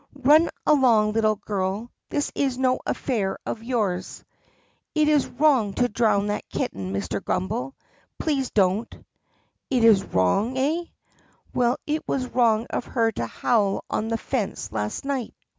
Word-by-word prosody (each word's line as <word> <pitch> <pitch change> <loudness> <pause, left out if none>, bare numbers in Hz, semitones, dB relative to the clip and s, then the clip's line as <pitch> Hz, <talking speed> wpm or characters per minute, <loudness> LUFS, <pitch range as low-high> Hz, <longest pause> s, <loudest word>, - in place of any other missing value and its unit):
"Run 305 +5 +6 0.2
along, 240 -8 +4
little 215 -1 +2
girl! 200 +2 -3 0.2
This 290 - -1
is 270 -3 0
no 255 -1 +2
affair 210 -8 -1
of 220 - -4
yours!" 210 -7 -2 0.7
"It 305 -1 +3
is 300 -3 +3
wrong 260 -8 +2
to 245 - +2
drown 210 -2 +2
that 205 0 -3
kitten, 95 -1 -3
Mr. 100 -2 -3
Grummbel. 125 +8 -2 0.4
Please 275 -5 -1
don't!" 200 +2 0 0.6
"It 250 -3 +2
's 220 -4 +6
wrong, 195 - +1
eh 310 +6 0
4? - - -28 0.7
Well, 245 0 +2
it 305 +1 -1
was 260 -2 -1
wrong 230 -2 +2
of - - -2
her 230 -2 +1
to 115 - -3
howl 205 - 0
on 220 - -1
the 230 0 0
fence 230 -4 -3
last 105 - -3
night." 270 -4 -3
230 Hz, 150 wpm, -24 LUFS, 200-260 Hz, 0.7 s, Run